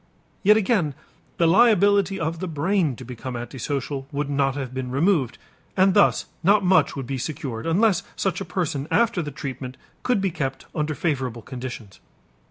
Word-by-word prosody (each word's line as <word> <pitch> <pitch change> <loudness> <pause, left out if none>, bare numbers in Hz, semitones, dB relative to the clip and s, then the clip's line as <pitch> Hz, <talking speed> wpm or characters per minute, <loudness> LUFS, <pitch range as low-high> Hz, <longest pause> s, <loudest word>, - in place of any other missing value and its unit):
Yet 210 +2 +6
again 190 - +1 0.4
the 170 - +3
liability 200 0 +4
of 160 +1 -2
the 185 - -3
brain 165 -1 0
to 125 - -10
become 125 +1 -6
antisocial 135 +3 -4
would 145 0 -2
not 140 -1 +1
have 135 -3 -5
been 130 -1 -4
removed, 140 - +1 0.4
and 190 0 +5
thus 205 - +4 0.2
not 200 +3 +4
much 185 +1 +4
would 135 -2 -4
be 135 +1 -3
secured 140 -3 -4
unless 185 +2 +3
such 190 -1 -1
a - - -3
person 155 -6 -2
after 230 -5 +2
the 150 - -4
treatment 130 -2 -6 0.2
could 250 -4 +1
be 195 -1 0
kept 135 -5 -4
under 150 0 -1
favorable 130 -8 -2
conditions. 120 -7 -8
150 Hz, 170 wpm, -24 LUFS, 130-190 Hz, 0.4 s, Yet